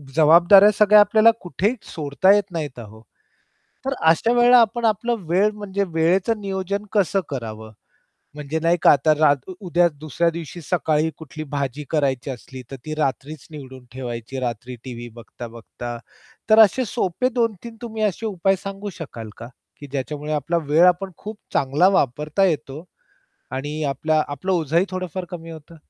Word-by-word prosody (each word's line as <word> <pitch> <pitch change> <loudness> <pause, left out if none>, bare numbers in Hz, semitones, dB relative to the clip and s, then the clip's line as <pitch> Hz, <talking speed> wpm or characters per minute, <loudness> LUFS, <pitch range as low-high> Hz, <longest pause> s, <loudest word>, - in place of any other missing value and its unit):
जबाबदाऱ्या 170 +6 +7
सगळ्या 210 0 +6
आपल्याला 215 +2 +5
कुठेही 195 +6 -1 0.2
सोडता 155 +5 +2
येत 200 -2 -1
नाहीत 150 -7 -5
आहो. 110 -1 -12 0.9
तर 270 - 0 0.2
अशा 225 +8 +2
वेळेला 245 +1 +6
आपण 230 +1 +1
आपलं 230 +2 +1
वेळ 195 +5 +3
म्हणजे 200 -1 -3
वेळेचं 185 +7 +1
नियोजन 195 0 -3
कसं 200 -2 +2
करावं? 110 -4 -6 0.6
म्हणजे 150 +2 -4
नाही 170 +1 +3
का - - +7
आता 150 +2 +3
रात 145 -1 +2
उद्या 175 -2 +2
दुसऱ्या 155 +3 0
दिवशी 170 +1 -8
सकाळी 155 0 0
कुठली 155 0 -8
भाजी 140 0 -3
करायची 140 -4 -1
असली, 130 0 -8
तर - - -5
ती 155 - -4
रात्रीच 145 0 -3
निवडून 130 -4 -11
ठेवायची, 120 0 -6
रात्री 125 0 -4
टीव्ही 120 -2 -8
बघता, 120 0 -10
बघता. 120 +1 -8 0.5
तर 215 +1 +6
असे 225 +4 +5
सोपे 230 +3 -1
2-3 230 -2 -2
तुम्ही 220 -2 -4
असे 210 +2 -1
उपाय 195 -1 +1
सांगू 195 +1 -6
शकाल 115 -8 -8
का? 115 - -9 0.3
की 145 - -9
ज्याच्यामुळे 145 +2 -4
आपला 150 +3 -1
वेळ 155 +4 +5
आपण 185 +2 +1
खूप 215 +1 -8 0.2
चांगला 145 +7 +3
वापरता 150 +8 0
येतो 155 -3 -2 0.7
आणि 145 +4 -4
आपला 155 +3 +1
आपलं 145 +7 -3
ओझंही 165 0 +1
थोडंफार 185 -1 -4
कमी 165 -2 -8
होतं. 160 +1 -12
160 Hz, 155 wpm, -22 LUFS, 140-195 Hz, 0.9 s, जबाबदाऱ्या